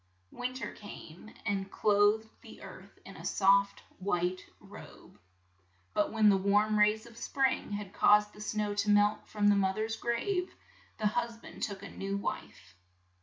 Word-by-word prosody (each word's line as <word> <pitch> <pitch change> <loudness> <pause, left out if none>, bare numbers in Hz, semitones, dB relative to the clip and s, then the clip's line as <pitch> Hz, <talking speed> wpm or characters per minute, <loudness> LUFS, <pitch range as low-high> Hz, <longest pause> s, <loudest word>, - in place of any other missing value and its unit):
Win 250 +1 -4
ter 260 - -5
came 205 -1 -11
and 195 -2 -1
clothed 210 +2 +3
the - - -13
earth - - -12
in - - -11
a - - -11
soft 200 0 +2 0.2
white 185 -1 -1 0.2
robe, - - -14 0.7
but 205 - +1
when 220 -1 +3
the 200 -2 +6
warm 205 +2 +2
rays 210 +2 +3
of 235 -1 -14
spring 265 -2 -1
had 205 -1 -5
caused 210 0 +4
the 210 - -12
snow 210 -1 -2
to 205 +1 -1
melt 205 +1 +3
from 205 -1 0
the 205 - +5
moth 190 0 +1
er's 220 +1 -2
grave, 360 - -2 0.4
the 215 - -3
hus 235 +2 -1
band - - -13
took 200 -3 -4
a 200 - -8
new 195 0 -3
wife. 100 - -6
210 Hz, 170 wpm, -31 LUFS, 200-220 Hz, 0.7 s, the